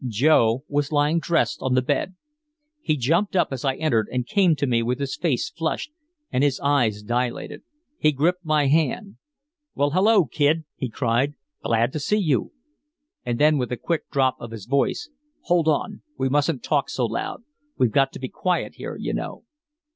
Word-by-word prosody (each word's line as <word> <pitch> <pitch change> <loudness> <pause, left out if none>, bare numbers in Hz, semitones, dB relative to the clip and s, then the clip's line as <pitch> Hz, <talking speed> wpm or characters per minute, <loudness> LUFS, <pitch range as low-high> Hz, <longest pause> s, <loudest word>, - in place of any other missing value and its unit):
Joe 120 0 +3
was 145 0 -1
lying 150 +2 +2
dressed 165 +1 0
on 130 -1 0
the 130 - +4
bed. 145 +7 -1 0.7
He 155 - 0
jumped 170 - +1
up 180 - +3
as 130 -2 -5
I 135 -2 +1
entered 115 -10 +1
and 125 -1 -1
came 185 0 +3
to 145 - -1
me 120 -3 +1
with 120 +2 -1
his 140 -1 -3
face 150 -9 -1
flushed 165 - -3 0.4
and 130 - +1
his 140 -2 +1
eyes 120 -8 +1
dilated. 120 +2 -2 0.4
He 155 - +4
gripped 175 +6 0
my 155 -2 +2
hand. 160 +7 0 0.6
"Why, 145 +1 +2
hello, 195 0 +4
Kid," 150 +5 +1
he 130 - -4
cried. 125 +5 0 0.3
"Glad 115 +2 +1
to 155 - -2
see 210 +9 +1
you!" 155 - 0 0.7
And 120 -1 -2
then 150 +1 +4
with 125 -2 -2
a 125 - -2
quick 165 +4 -3
drop 130 -2 +1
of 120 - -7
his 110 -3 -8
voice: 140 - 0 0.3
"Hold 170 -2 +1
on, 155 -2 0 0.2
we 130 - 0
mustn't 145 0 +1
talk 145 -2 0
so 125 - -1
loud, 115 - -4 0.3
we've 125 -3 +2
got 135 +1 +3
to - - -8
be 130 - -4
quiet 180 +6 -1
here, - - -6
you - - -3
know." - - -5
140 Hz, 185 wpm, -23 LUFS, 125-160 Hz, 0.7 s, the